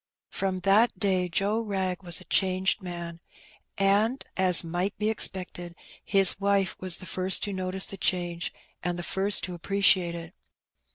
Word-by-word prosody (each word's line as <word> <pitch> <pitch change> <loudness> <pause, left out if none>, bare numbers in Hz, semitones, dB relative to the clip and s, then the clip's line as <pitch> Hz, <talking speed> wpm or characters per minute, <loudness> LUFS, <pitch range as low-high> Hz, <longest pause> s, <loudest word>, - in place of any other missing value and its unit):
» - - -60
Prom 190 -1 -2
that 205 +6 +3
day 185 -3 0
Joe 200 +5 0
Wrag 190 -5 -3
was 175 -3 -3
a - - -11
changed 190 +2 +1
man, 170 -2 -7 0.6
and, 205 +6 +2
as 185 -2 +4
might 175 +4 -3
be 215 +1 0
expected, 180 -4 -1 0.3
his 195 -2 +3
wife 200 -1 +1
was 185 -2 -1
the - - -8
first 185 +1 +1
to 205 - -1
notice 185 0 0
the 195 - -8
change 175 -2 -2 0.3
and 175 +1 -3
the 175 - -5
first 195 +3 +2
to 180 - -2
appreciate 185 -1 +2
it. 165 +1 -9
185 Hz, 165 wpm, -27 LUFS, 175-195 Hz, 0.6 s, as